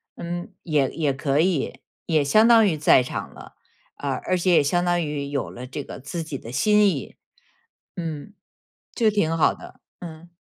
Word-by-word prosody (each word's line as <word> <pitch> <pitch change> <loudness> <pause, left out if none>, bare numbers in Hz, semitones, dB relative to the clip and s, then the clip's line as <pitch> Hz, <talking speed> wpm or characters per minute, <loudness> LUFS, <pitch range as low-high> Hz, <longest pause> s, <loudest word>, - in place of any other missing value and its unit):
嗯， 175 +2 -6
也 150 -6 +1
也 150 -4 -1
可 135 +1 0
以， 170 -3 0 0.3
也 155 -4 +2
相 215 +11 +4
当 230 -2 +6
于 170 - +1
在 145 -4 +4
场 - - -6
了， - - -13 0.4
啊， 140 - -5 0.2
而 185 - +1
且 180 +1 +2
也 165 - +5
相 175 +5 +1
当 175 -1 +1
于 150 -2 -4
有 140 -1 -3
了 125 +1 -9
这 140 +2 -6
个 - - -9
自 150 +6 -5
己 150 -3 -6
的 115 - -10
心 210 +10 +3
意， 145 -8 -5 0.8
嗯， 165 +2 -6 0.6
就 225 -3 +2
挺 165 -6 0
好 155 - +3
的， - - -14 0.2
嗯。 170 -1 -10
160 Hz, 195 characters per minute, -23 LUFS, 140-175 Hz, 0.8 s, 当